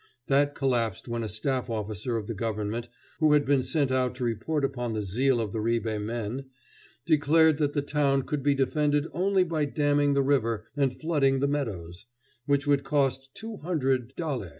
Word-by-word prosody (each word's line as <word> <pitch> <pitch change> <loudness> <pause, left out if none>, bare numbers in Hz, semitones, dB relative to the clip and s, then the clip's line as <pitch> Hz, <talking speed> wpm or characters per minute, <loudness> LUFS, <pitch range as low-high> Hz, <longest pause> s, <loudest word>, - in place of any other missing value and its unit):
That 145 +1 +2
collapsed 120 -7 -1
when 120 0 -2
a 110 - -2
staff 125 +4 -2
officer 110 +1 -3
of 110 - -4
the 115 - -4
government, 110 +2 -3 0.3
who 155 -2 +4
had 145 -1 +4
been 140 -1 +3
sent 140 0 0
out 130 -1 +1
to 130 - -5
report 125 +6 -1
upon 125 -4 -3
the 110 -1 -2
zeal 120 +6 +1
of 110 -3 -2
the 110 - -2
Ribe 110 -1 -1
men, 115 +4 -4 0.6
declared 160 0 +4
that 145 -2 +1
the 145 - 0
town 140 -2 +1
could 150 0 -3
be 140 +1 +2
defended 145 +2 +1
only 190 +1 +2
by 160 -4 -1
damming 145 0 +2
the 140 0 +2
river 115 -6 +1
and 135 -3 0
flooding 140 -5 +2
the 140 - +1
meadows, 105 - -4 0.4
which 140 0 +2
would 140 -1 +2
cost 135 -2 0
two 225 -1 -7
hundred 135 -6 -1
daler. 140 - -3
135 Hz, 185 wpm, -27 LUFS, 115-145 Hz, 0.6 s, who